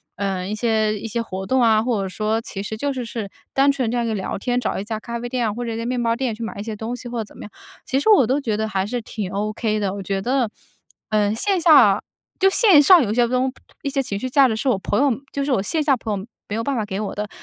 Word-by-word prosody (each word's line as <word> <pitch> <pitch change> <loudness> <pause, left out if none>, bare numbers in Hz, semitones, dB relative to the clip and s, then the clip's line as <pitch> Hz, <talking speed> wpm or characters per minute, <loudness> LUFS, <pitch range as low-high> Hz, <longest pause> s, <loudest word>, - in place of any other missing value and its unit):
呃， 190 -2 -2
一 210 - -3
些 215 -1 +1
一 225 - -5
些 230 +2 -2
活 190 -4 -5
动 260 +4 +2
啊， 220 -2 +4
或 230 -4 0
者 190 - -4
说 215 +3 -1
其 195 - -6
实 220 - -4
就 285 +4 -1
是 250 -2 -4
是 225 -4 -5 0.2
单 275 +1 +4
纯 255 -5 -1
这 - - -2
样 235 - 0
一 - - -2
个 - - -1
聊 190 - -3
天， 245 +4 -1
找 245 - -2
一 - - -3
家 215 +1 -4
咖 235 +1 -5
啡 240 +1 -5
店 245 -1 -1
啊， 210 - -2
或 240 +2 -4
者 230 - -3
一 - - -4
家 230 - -4
面 250 0 -1
包 230 -1 +1
店 250 -2 -2
去 230 - -7
买 220 - -5
一 - - -4
些 220 -1 -5
东 220 +3 -5
西 245 - -8
或 240 - -4
者 220 - -1
怎 - - -16
么 - - -9
样， 210 - -10 0.3
其 265 - 0
实 360 - +1
我 390 - +6
都 265 +3 +1
觉 220 -5 -1
得 220 0 -1
还 195 -2 -1
是 240 +3 -3
挺 210 -3 -5
ok 215 +1 -1
的。 195 -2 -1
我 200 -1 -6
觉 195 0 -2
得， 250 0 +1 0.6
嗯， 210 -1 +2
线 385 - +1
下 245 - +6 0.4
就 385 - +5
线 385 -7 +6
上 350 +2 +8
有 210 -2 -1
些 240 +1 +3
东 255 +1 0 0.3
一 280 - -1
些 275 0 0
情 205 -6 -4
绪 255 +4 -3
价 275 +1 +5
值 220 - -1
是 265 - -2
我 235 - +2
朋 205 - -1
友 285 - +4 0.2
就 280 0 -2
是 285 - -1
我 225 - +2
线 310 - 0
下 285 -3 +3
朋 215 -4 -3
友 195 - -9 0.2
没 205 - -2
有 230 - -1
办 280 - 0
法 225 - 0
给 195 -1 -4
我 210 - -4
的。 210 +1 -4
230 Hz, 335 characters per minute, -21 LUFS, 210-255 Hz, 0.6 s, 上